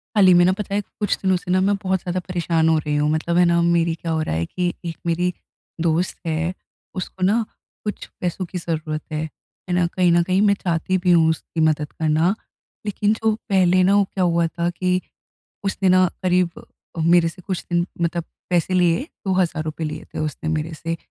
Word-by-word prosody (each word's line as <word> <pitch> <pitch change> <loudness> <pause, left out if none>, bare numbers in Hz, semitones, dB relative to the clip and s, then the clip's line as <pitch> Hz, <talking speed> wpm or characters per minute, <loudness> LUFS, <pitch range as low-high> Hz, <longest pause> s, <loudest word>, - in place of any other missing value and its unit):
हाल 195 -3 +6
ही 185 - +8
में 175 0 +6
ना 185 - +4
पता 200 -1 -3
है, 205 - +2
कुछ 205 0 -2
दिनों 190 -1 +3
से 180 0 -5
ना 185 - +4
मैं 200 +1 +3
बहुत 190 -1 +1
ज़्यादा 180 0 -2
परेशान 170 -3 +1
हो 160 - +4
रही 150 -1 -1
हूँ। 150 +1 +2
मतलब 170 +2 0
है 180 - +6
ना, 170 0 +3
मेरी 170 -1 +2
क्या 165 0 -4
हो 160 0 0
रहा 120 - -2
है 80 +1 0
कि, 175 - -2
एक 165 -1 -4
मेरी 175 +2 +1 0.5
दोस्त 170 +2 +1
है, 165 +2 -1 0.4
उसको 185 0 -5
ना 215 +5 +3 0.4
कुछ 210 - -4
पैसों 180 +1 -2
की 180 - -6
ज़रूरत 155 -2 -3
है। 155 0 -2 0.5
है - - 0
ना, 180 -1 +3
कहीं 180 0 +2
न 170 0 +5
कहीं 185 +2 +1
मैं 205 -1 +5
चाहती 175 +1 0
भी 180 - +4
हूँ 165 -2 +5
उसकी 160 +1 -3
मदद 155 -2 +1
करना। 160 +4 +2 0.5
लेकिन 210 0 +1
जो 220 0 +1 0.2
पहले 185 -2 +4
ना 195 +2 +4
वो 205 - +5
क्या 190 0 -2
हुआ 170 -1 +2
था? 170 +1 -2
कि, 180 +1 0 0.6
उसने 195 -1 +1
ना 185 0 +5 0.2
क़रीब, 180 -1 +2 0.5
मेरे 165 +1 +4
से 165 +2 -11
कुछ 185 -1 -4
दिन 175 0 +1
मतलब 170 0 0 0.3
पैसे 180 +1 +1
लिए, 180 - +2 0.2
₹2,000 165 -4 0
लिए 155 - -5
थे - - -4
उसने 155 +1 -3
मेरे 160 +1 -2
से 165 +2 -4
175 Hz, 210 wpm, -22 LUFS, 165-185 Hz, 0.6 s, ही